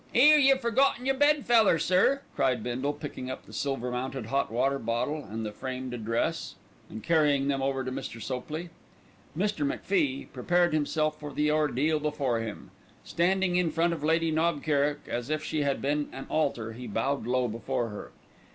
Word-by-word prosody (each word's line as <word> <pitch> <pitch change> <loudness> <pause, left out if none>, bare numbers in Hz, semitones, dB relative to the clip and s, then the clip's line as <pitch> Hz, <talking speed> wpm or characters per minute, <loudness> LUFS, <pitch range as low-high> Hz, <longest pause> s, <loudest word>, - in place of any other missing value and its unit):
"'Ere, 300 +5 +7
you've 270 -1 +5
forgotten 245 +2 +2
your 270 - +3
bed 290 +1 +3
feller, 225 -7 +5
sir!" 185 - +3
cried 130 -5 +1
Bindle, 130 +4 -1
picking 145 -3 -7
up 130 - -6
the - - -14
silver 135 -3 -2
mounted 125 0 -3
hot 135 +2 -1
water 135 +4 +1
bottle 125 +6 -2
and 110 +2 -5
the 105 - -4
framed 130 +2 -5
address 115 -1 -2 0.3
and 110 - -8
carrying 150 -4 +3
them 135 -1 0
over 135 0 -1
to 130 - -4
Mr. 115 -2 -6
Sopley. 150 +8 -5 0.7
Mr. 205 -3 0
MacFie 145 -1 0
prepared 175 +6 +2
himself 155 0 0
for 150 -1 -7
the 150 +2 +1
ordeal 150 0 +1
before 145 -6 -1
him. 110 -2 -6 0.3
Standing 180 +1 +1
in 180 -2 +2
front 165 +2 +1
of 155 -3 -6
Lady 165 +1 +2
Knob 160 -1 +1
Kerrick 145 -1 +1
as 120 +2 -3
if 155 0 -1
she 155 - -1
had 140 -1 -1
been 145 +1 0
an 135 - -7
altar, 120 -8 0
he 125 +2 -8
bowed 115 +4 -1
low 125 0 +1
before 115 +1 -2
her. 105 - -8
145 Hz, 180 wpm, -28 LUFS, 125-165 Hz, 0.7 s, Ere